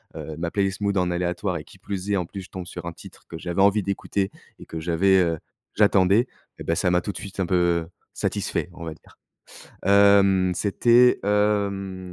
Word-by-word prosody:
heu, 80 - -6
ma 85 0 -2
playlist 95 0 -1
mood 100 0 0
en 90 -1 +1
aléatoire 90 +1 -2
et 75 - -8
qui - - -17
plus 100 0 -5
est, - - +3
en 90 - -1
plus 95 +3 -8
je - - -14
tombe 90 -1 -7
sur 90 -1 -8
un 85 - -5
titre - - -15
que 80 - -8
j'avais 90 +2 -2
envie 100 0 +4
d'écouter 100 0 -2 0.3
et - - -12
que 80 - -6
j'avais, 90 +4 +3
heu, 85 -3 +1 0.4
j'attendais 100 +2 +4 0.3
et - - -8
bah 85 - 0
ça 90 - +1
m'a 90 0 +2
tout 100 - -4
de - - -9
suite 100 -1 -8
un - - +1
peu, 85 -2 +1 0.3
satisfait - - -2
on 85 - -9
va 80 - -5
dire. - - -22 0.7
Hem 100 -2 +5
c'était, 120 +6 +4
hem, 100 -3 0
95 Hz, 210 wpm, -24 LUFS, 90-100 Hz, 0.7 s, Hem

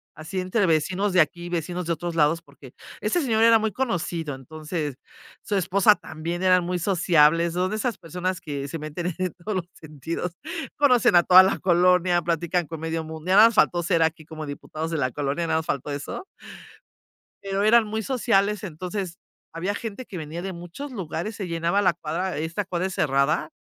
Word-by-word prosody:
así 160 +5 -5
entre 185 +3 +1
vecinos 185 +5 +1
de 180 - +6
aquí, 175 +2 -2
vecinos 175 +1 -3
de 170 - 0
otros 170 +1 -5
lados, 160 +1 +3
porque - - -16 0.3
ese 350 - 0
señor 225 -4 +2
era 230 -1 +7
muy 220 0 -1
conocido, 175 - -2
entonces, 150 +1 -5 0.5
su 205 - -2
esposa 195 +3 +4
también, 165 0 -6
eran 185 -1 +4
muy 180 +1 -2
sociables, 170 -2 +3
son 180 +1 0
de 215 - -3
esas 220 0 -2
personas 180 +2 -4
que 140 -2 -5
se 165 +3 -5
meten 160 +4 -4
en 185 -2 -1
todos 195 +3 -5
los 175 - -3
sentidos, 160 +3 -5 0.5
conocen 250 -10 +4
a 175 - +8
toda 185 +2 +8
la 190 - 0
colonia, 180 -1 +3
platican 170 +1 0
con 165 +1 -7
medio 165 0 -3
mundo, 160 +2 -9
ya 190 - +4
nada 220 +3 +9
más - - -6
faltó 175 -4 +3
ser 170 -1 +1
aquí 160 -1 0
como 155 -1 -7
diputados 155 +3 -5
de 165 - -2
la 130 -3 0
colonia, 145 +5 -2
nada 160 - +1
más 160 - -6
faltó 140 +1 -2
eso. 145 - -5 1.2
Pero 195 0 -1
eran 230 +1 +5
muy 220 +1 -3
sociales, 210 -5 +1
entonces 180 +1 -5 0.3
había 180 +5 -3
gente 225 +3 -6
que 190 - -8
venía 160 +1 -6
de 190 +1 -5
muchos 175 +12 -8
lugares, 190 +1 -4
se 200 - -5
llenaba 170 +4 +1
la 185 -2 +4
cuadra, 170 +2 -3
esta 160 +6 -2
cuadra 180 0 -2
es 190 - -6
cerrada, 150 +1 +1
175 Hz, 195 wpm, -24 LUFS, 160-195 Hz, 1.2 s, nada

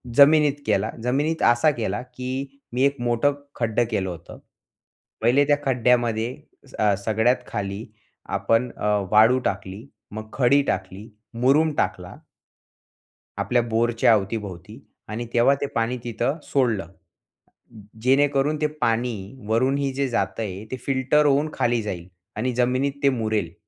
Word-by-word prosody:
जमिनीत 150 +1 +6
केला, 105 0 +1
जमिनीत 145 +6 0
असा 120 +6 +4
केला, 110 -4 -3
की 130 +2 -6
मी 125 +2 +1
एक 140 0 +2
मोठं 120 +4 +1 0.2
खड्डं 115 0 +1
केलं 95 -4 -1
होतं, 85 -3 -10 0.8
पहिले 125 +5 +4
त्या 145 -1 +4
खड्ड्यामध्ये 120 -2 +1 0.4
अ, 105 -1 +3
सगळ्यात 110 +3 +2
खाली 100 0 -4 0.5
आपण 115 +2 +1
अ, - - -4 0.3
वाळू 110 +4 +6
टाकली, 100 +2 -4 0.3
मग 110 +1 -7
खडी 140 +2 +4
टाकली, 95 +3 -4 0.3
मुरूम 150 +5 +4
टाकला. - - -2 1.2
आपल्या 125 -1 +2
बोरच्या 115 0 +2
अवतीभोवती 100 -3 -3 0.3
आणि 110 +3 -4
तेव्हा 120 +4 +4
ते - - +1
पाणी 115 +2 0
तिथं 120 +5 -2
सोडलं. 115 - 0 1.1
जेणेकरून 140 +3 +2
ते 150 - +3
पाणी 115 +1 +1 0.3
वरूनही 135 +5 +1
जे 140 0 -1
जातंय 105 -4 -2
ते 130 - -3
फिल्टर 140 +2 +2
होऊन 145 +2 +2
खाली 120 -1 +1
जाईल 90 -5 -5 0.3
आणि 125 0 -1
जमिनीत 130 +3 +1
ते 140 - +6
मुरेल. 110 -8 -1
120 Hz, 130 wpm, -23 LUFS, 110-135 Hz, 1.2 s, जमिनीत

